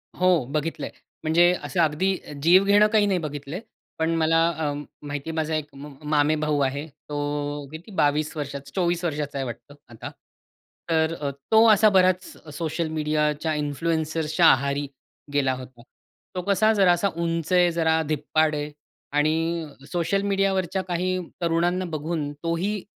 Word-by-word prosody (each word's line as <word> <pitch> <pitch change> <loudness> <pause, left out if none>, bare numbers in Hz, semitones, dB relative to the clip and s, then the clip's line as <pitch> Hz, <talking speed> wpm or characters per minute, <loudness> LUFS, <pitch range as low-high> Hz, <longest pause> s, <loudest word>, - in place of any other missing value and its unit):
हो. 180 -7 +3
बघितलंय, 155 +2 -2 0.3
म्हणजे 170 +3 +4
असं 180 - -3
अगदी 165 +5 +2 0.3
जीव 180 +4 +6
घेणं 205 +1 +5
काही 210 -1 +5
नाही 195 -3 +1
बघितलंय. 150 +2 -5 0.4
पण 160 +1 +1
मला 165 +1 +3
अं, 145 -2 -2 0.2
माहिती 145 +2 -5
आहे 160 - -4
माझा 160 0 -1
एक 150 -1 -3
अं, 140 0 -10
मामेभाऊ 150 0 +2
आहे. 140 +3 -3
तो 145 0 -4
किती 165 +7 -10
22 150 +2 +1
वर्षाचा, 140 -1 -6
24 175 -2 0
वर्षाचा 145 -3 -3
आहे 135 - -2
वाटतं 120 +4 -9
आता. 115 -2 -8 0.8
तर 160 0 +2
अ, 140 - -1 0.2
तो 220 +1 +7
असा 215 0 +6
बराच 185 -2 +3 0.3
सोशल 165 +1 -2
मीडियाच्या 150 0 0
इन्फ्लुअन्सर्सच्या 155 +2 0
आहारी 140 +1 +2 0.5
गेला 135 -2 +2
होता. 130 -2 -10 0.5
तो 180 - -1
कसा 210 +2 +4
जरा 195 -4 +4
असा 175 +3 +2
उंच 165 0 -2
आहे, 175 -1 +5
जरा 160 -1 +2
धिप्पाड 155 +1 +1
आहे 150 0 -4 0.5
आणि 160 +2 +1 0.3
सोशल 180 +3 0
मीडियावरच्या 195 -2 0
काही 180 +1 -1 0.2
तरुणांना 175 +2 +1
बघून 155 -2 -3
तोही 180 +5 -1
160 Hz, 145 wpm, -24 LUFS, 145-175 Hz, 0.8 s, तो